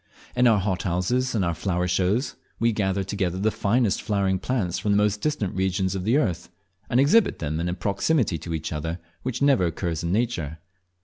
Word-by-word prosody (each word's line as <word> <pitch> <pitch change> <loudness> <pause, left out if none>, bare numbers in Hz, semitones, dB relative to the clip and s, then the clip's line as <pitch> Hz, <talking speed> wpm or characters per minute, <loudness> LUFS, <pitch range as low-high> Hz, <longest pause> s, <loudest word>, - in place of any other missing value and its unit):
In 125 0 +4
our 110 -3 +5
hothouses 95 +6 0
and 100 -4 +1
at - - +1
our - - -1
flower 90 +1 -1
shows 95 +8 0 0.2
we 115 0 +3
gather 100 -2 0
together 95 -2 -2
the 105 +3 +1
finest 110 +1 +1
flowering 95 -3 0
plants 100 -7 -1
from 105 - +1
the - - +3
most 105 0 +1
distant 145 -11 -1
regions 95 0 0
of 95 -1 -4
the 120 +6 +3
earth, 90 - -1 0.4
and 120 - +3
exhibit 180 +11 +4
them 80 0 -3
in 85 +1 -1
a 90 - -2
proximity 100 - 0
to 85 -2 -4
each 80 - -4
other 80 +2 -3 0.2
which 130 +1 -2
never 135 -11 +4
occurs 85 -1 -3
in 85 - -2
nature. 95 -9 -1
95 Hz, 200 wpm, -25 LUFS, 90-115 Hz, 0.4 s, our